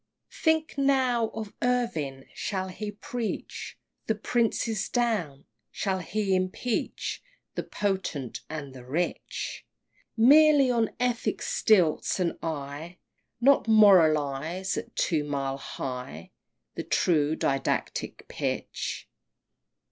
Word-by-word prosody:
XVIII. - - -14
Think 320 -2 +2
now 260 -4 +3
of 220 -2 -7
Irving! 165 - -1
shall 190 -2 -3
he 210 +3 -5
preach 225 +2 -5 0.3
The 220 - +2
princes 220 -1 0
down, 210 - -1 0.2
shall 190 -2 -1
he 195 +3 -1
impeach 185 +6 -2 0.3
The - - -2
potent 190 - -3
and 150 -4 -6
the 130 -2 -10
rich, 155 +8 -3 0.5
Merely 285 +2 +7
on 230 -2 +2
ethic 245 -1 0
stilts, 185 -5 +2
and 175 -2 0
I 155 +2 -5 0.4
Not 270 0 +4
moralize 170 -4 +4
at - - -6
two 160 -4 +1
mile 140 -2 -2
high 125 - -6 0.4
The - - -4
true 155 -3 +2
didactic 135 -3 -2
pitch! - - -3
190 Hz, 105 wpm, -27 LUFS, 150-230 Hz, 0.5 s, Merely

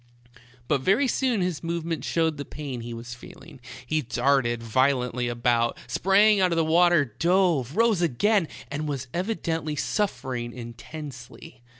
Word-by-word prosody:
But 140 -1 +1
very 200 - +3
soon 250 -5 +1
his 180 -4 -2
movements 165 -4 -3
showed 160 -2 +1
the 145 - -4
pain 140 -5 -6
he 120 +1 -7
was 120 +1 -7
feel 120 - -13
ing; - - -14 0.2
he 155 0 0
darted 120 -2 +1
violently 125 0 +1
about, 120 0 +1
sprang 205 +2 +4
out 185 -1 +3
of - - +1
the 165 -1 +2
water, 170 -1 +4
dove, 170 - +2
rose 225 -5 +3
again, 175 - +2 0.2
and 150 +2 -3
was 135 -3 -3
evidently 165 -5 -2
suffer 135 - -2
ing 120 -1 -4
intensely. 125 +1 -10
150 Hz, 155 wpm, -25 LUFS, 125-175 Hz, 0.2 s, sprang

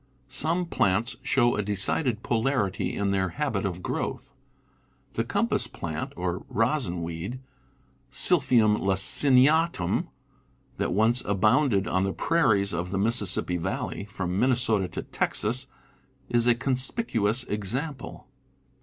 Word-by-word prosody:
Some 160 +7 0
plants 110 - 0
show 125 -2 +2
a - - 0
decided 105 +4 0
polarity 115 -4 -1
in 100 -1 0
their 95 -1 0
habit 135 -10 -1
of 90 -2 -4
growth. - - -4 0.8
The - - -1
compass - - 0
plant 80 -2 -5
or 90 0 -3
rosin 115 - 0
weed 85 +9 -5 0.7
{Sil 175 +4 +4
p 130 -2 +2
phium 110 -2 +4
laciniatum) 130 - +3 0.7
that - - -1
once 110 +6 +2
abounded 105 +2 +2
p^ - - -5
on 95 +1 +2
the 95 0 -1
prairies 110 - +1
of 85 +2 -3
the 95 - -2
Mississippi 100 -4 +1
valley, 85 +3 -4
from 95 -2 -3
Minnesota 115 -6 +2
to 90 - -6
Texas, 125 +5 -2 0.6
is 120 0 +2
a 120 - +5
con 125 +2 -1
spicuous 125 - -1
example. 125 +9 -4
110 Hz, 130 wpm, -26 LUFS, 95-130 Hz, 0.8 s, a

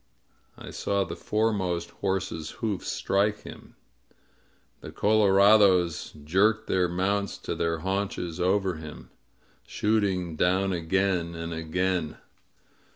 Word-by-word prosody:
I - - -9
saw 100 -1 -1
the 90 - -6
foremost 95 -6 -1
horse's 95 -5 -3
hoofs 105 -5 -3
strike 105 +2 0
him. - - -12 1.0
The - - -9
color 105 -2 +3
ados 95 -6 +4
jerked 105 +7 +2
their 90 -2 +1
mounts 100 +3 -1
to - - -5
their 85 -1 -1
haunches 95 -2 -3
over 95 -1 +1
him, 80 -1 -10 0.6
shooting 95 -6 0
down 95 +4 +1
again 90 0 0
and 85 0 -5
again. 85 0 -2
95 Hz, 110 wpm, -27 LUFS, 85-100 Hz, 1.0 s, ados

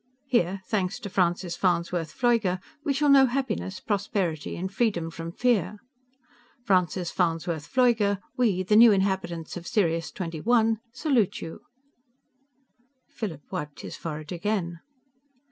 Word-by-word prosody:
Here, 195 -7 +1
thanks 185 -4 -1
to 200 - -6
Francis 175 -1 +1
Farnsworth 170 -3 0
Pfleuger, 225 -7 +1 0.2
we 290 - 0
shall 285 +2 +1
know 275 -1 +7
happiness 240 -7 -2
prosperity 195 -7 -2
and 190 +3 -4
freedom 195 -7 0
from 165 0 -6
fear._ 215 -1 +1 0.9
FRANCIS 180 -2 +1
FARNSWORTH 165 -3 -1
PFLEUGER, 230 -6 +3 0.2
WE, 215 -8 +2
THE 210 +3 +2
NEW 230 -1 +9
INHABITANTS 190 -4 -1
OF 175 0 -8
SIRIUS 165 - 0
XXI, 220 +7 +1
SALUTE 255 - +1
YOU! 165 - -7 1.5
Philip 200 - -6
wiped 150 -6 -5
his - - -7
forehead 155 -2 -6
again. 175 -2 -2
190 Hz, 125 wpm, -26 LUFS, 170-225 Hz, 1.5 s, NEW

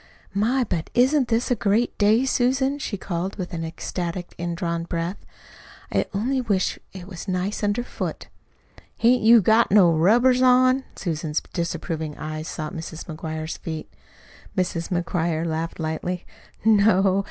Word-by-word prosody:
"My, 235 +6 +2
but 170 -8 -3
isn't 260 +2 +4
this 235 +2 0
a - - +4
great 215 +2 +1
day, 220 +5 +4
Susan!" 265 +2 +1
she 215 -7 -3
called, 185 0 -3
with 180 -2 -6
an 165 -1 -3
ecstatic, 175 +2 -4
indrawn 170 -1 -3
breath. 170 +3 -3 0.7
"I - - +1
only 250 +7 0
wish 200 -6 0
it 185 -2 -9
was 180 -3 -8
as - - -27
nice 185 +2 -2
under 205 +4 +1
foot." - - -5 0.7
"Hain't 245 +1 +4
you 225 -1 +7
got 225 +4 +4
no 190 -4 +6
rubbers 240 +10 +4
on?" 255 +1 +4
Susan's 155 -3 -2
disapproving 160 -3 -3
eyes 155 0 -5
sought 155 -1 -5
Mrs. 160 0 -7
McGuire's 160 -1 -5
feet. 160 -2 -6 0.6
Mrs. 180 -2 -1
McGuire 170 -2 -1
laughed 165 +1 -3
lightly. 165 +3 -3 0.4
"No. 200 -3 +4
185 Hz, 145 wpm, -24 LUFS, 165-230 Hz, 0.7 s, you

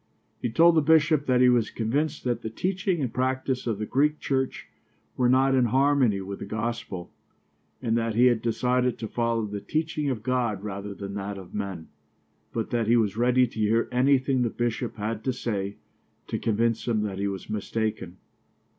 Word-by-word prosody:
He 120 - -1
told 170 +9 +5
the 160 - +4
bishop 155 -1 +3
that 125 -1 +3
he 125 - +7
was 120 -3 +3
convinced 140 +7 -1
that 120 -2 -1
the 110 - -4
teaching 185 - -1
and 125 -4 -2
practice 130 0 -1
of 110 -3 0
the 105 - -3
Greek 150 +6 +2
Church 130 -1 -2 0.5
were 125 -1 +2
not 135 +1 +4
in 130 -2 +4
harmony 130 -4 +3
with 100 +1 -6
the - - -5
gospel, 105 -4 -4 0.7
and 115 -2 +1
that 115 -1 0
he 120 +2 +5
had 120 -3 +3
decided 125 +1 +1
to 110 - -5
follow 115 -1 0
the 100 -1 -5
teaching 155 -2 -1
of 115 -5 -3
God 120 -6 -1
rather 100 -1 -5
than 100 0 -6
that 100 0 -4
of 95 -2 -11
men, 95 -5 -4 0.6
but 115 -2 -3
that 115 -2 0
he 120 +1 +5
was 105 -4 +1
ready 125 +2 +3
to 115 -2 -8
hear 110 +2 +2
anything 130 0 +3
the 120 - +1
bishop 120 +1 -2
had 110 0 -3
to 130 - 0
say 100 -5 -3 0.5
to - - -3
convince 115 +2 0
him 110 -3 +1
that 100 -2 -4
he 100 - 0
was 95 -1 -5
mistaken. 105 -3 -3
115 Hz, 190 wpm, -26 LUFS, 105-130 Hz, 0.7 s, he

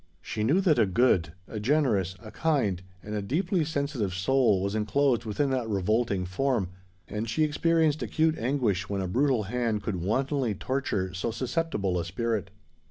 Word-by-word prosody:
She 105 - -4
knew 150 - +3
that 165 -9 +3
a 110 - +4
good—a 95 -2 +1
generous—a 110 - 0
kind—and 100 - -2
a 105 - -1
deeply 170 - 0
sensitive 140 - -2
soul 100 -1 +2
was 100 +1 -1
enclosed 120 +3 +1
within 135 +6 0
that 125 -4 -1
revolting 100 0 +1
form; 105 +1 0 0.4
and 105 +2 -4
she 155 +7 +1
experienced 155 0 +2
acute 160 0 +1
anguish 115 -8 0
when 100 -1 -1
a 95 - -2
brutal 130 +3 +2
hand 115 -1 -1
could 105 -4 -2
wantonly 130 - 0
torture 105 -9 -2
so 95 +5 -2
susceptible 115 - -1
a - - -1
spirit. 105 +3 -2
115 Hz, 155 wpm, -28 LUFS, 95-140 Hz, 0.4 s, a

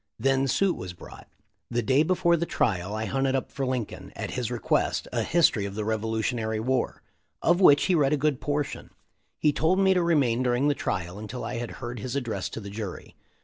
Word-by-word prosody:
Then 135 0 +2
suit 190 +7 +2
was 90 -1 -6
brought. - - -13 0.4
The 120 0 -1
day 130 +6 +3
before 170 +1 +3
the 170 +1 -2
trial 95 +3 0
I 110 +1 -2
hunted 135 +2 0
up 135 - -2
for 135 -2 -2
Lincoln, 125 -5 -4
at - - -4
his - - -2
request, - - 0
a - - +1
history 160 -11 +3
of 100 0 -5
the 105 0 -3
Revolutionary 110 0 -1
War, 125 +2 -1 0.4
of 175 +3 +3
which 145 -6 +7
he 185 - +2
read 145 -5 +3
a - - +3
good 145 -2 0
portion. 145 -1 -2 0.5
He 150 - +2
told 160 +6 +2
me 190 -1 +4
to 180 - +2
remain 140 -8 +2
during 125 +2 +2
the - - +3
trial 95 -7 -3
until 110 +4 -6
I - - -4
had 120 -1 -4 0.2
heard 120 0 -5
his 130 +4 -4
address 115 -8 -2
to - - -6
the 100 -2 -8
jury. 105 -3 -7
130 Hz, 210 wpm, -26 LUFS, 110-145 Hz, 0.5 s, which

